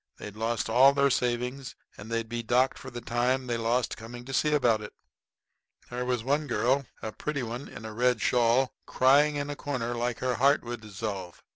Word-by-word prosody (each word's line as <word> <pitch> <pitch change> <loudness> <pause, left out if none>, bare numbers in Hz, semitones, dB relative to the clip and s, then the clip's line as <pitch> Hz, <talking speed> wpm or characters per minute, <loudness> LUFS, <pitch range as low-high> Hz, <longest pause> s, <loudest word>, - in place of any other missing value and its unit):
They'd 105 -1 -8
lost 115 0 -1
all 130 +5 +6
their 140 0 +3
savings 125 +2 -1 0.2
and 100 - -10
they'd 115 0 -1
be 120 +1 -3
docked 125 +3 +2
for 130 - -8
the 120 -1 -7
time 125 +3 0
they 120 -1 -1
lost 115 +2 0
coming 120 +2 -9
to 135 - -7
see 150 +3 +2
about 120 -7 +3
it. 105 - -8 1.0
There 125 +1 -3
was 125 -2 -1
one 145 +4 0
girl 125 +3 +1 0.2
a 110 - -3
pretty 145 +3 -3
one 120 +4 -5
in 110 - -10
a 110 - -6
red 125 +1 +2
shawl, 120 +3 +2
crying 145 +3 +4
in 145 0 -2
a - - -4
corner 125 -5 -3
like 120 0 -2
her 130 0 -1
heart 140 +3 +4
would 120 -1 -6
dissolve. 100 -4 -6
120 Hz, 200 wpm, -28 LUFS, 115-130 Hz, 1.0 s, all